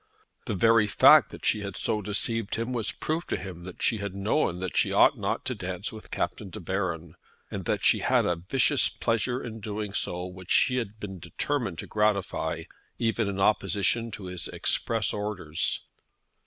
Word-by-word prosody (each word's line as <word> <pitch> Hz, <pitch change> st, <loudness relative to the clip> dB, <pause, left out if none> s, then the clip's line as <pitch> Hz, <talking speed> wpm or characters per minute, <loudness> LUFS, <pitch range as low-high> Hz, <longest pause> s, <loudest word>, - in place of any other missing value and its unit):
The 105 Hz, -, -1 dB
very 115 Hz, +2 st, +4 dB
fact -, -, +7 dB
that -, -, -9 dB
she 105 Hz, -, +3 dB
had 100 Hz, -2 st, -5 dB
so 105 Hz, -, 0 dB
deceived 105 Hz, +2 st, -1 dB
him 115 Hz, +3 st, -2 dB
was 115 Hz, -3 st, 0 dB
proof 160 Hz, +3 st, -3 dB
to -, -, -1 dB
him 90 Hz, -3 st, -8 dB
that 95 Hz, -, -8 dB
she 110 Hz, -, +2 dB
had 100 Hz, -2 st, -4 dB
known 100 Hz, -, 0 dB
that 95 Hz, -1 st, -4 dB
she -, -, +3 dB
ought -, -, +5 dB
not -, -, -2 dB
to -, -, -1 dB
dance 90 Hz, +1 st, -4 dB
with 110 Hz, -1 st, -11 dB
Captain 100 Hz, -, -3 dB
De 110 Hz, -, -8 dB
Baron, 85 Hz, -3 st, -3 dB, 0.4 s
and -, -, -5 dB
that -, -, -1 dB
she -, -, +5 dB
had -, -, +2 dB
a 90 Hz, -, +1 dB
vicious 130 Hz, -, +2 dB
pleasure 120 Hz, +2 st, -1 dB
in 115 Hz, -2 st, -6 dB
doing 105 Hz, -1 st, -4 dB
so 90 Hz, -2 st, -1 dB
which 90 Hz, -1 st, -10 dB
she 130 Hz, -, +4 dB
had 110 Hz, -3 st, -4 dB
been 95 Hz, -3 st, -6 dB
determined 95 Hz, -, -2 dB
to -, -, -5 dB
gratify 105 Hz, -2 st, 0 dB, 0.3 s
even 115 Hz, -2 st, 0 dB
in 100 Hz, -1 st, -3 dB
opposition 110 Hz, +3 st, +2 dB
to 105 Hz, -3 st, -7 dB
his 90 Hz, -2 st, -4 dB
express 115 Hz, -2 st, 0 dB
orders. 100 Hz, -6 st, -2 dB
105 Hz, 185 wpm, -27 LUFS, 95-115 Hz, 0.4 s, fact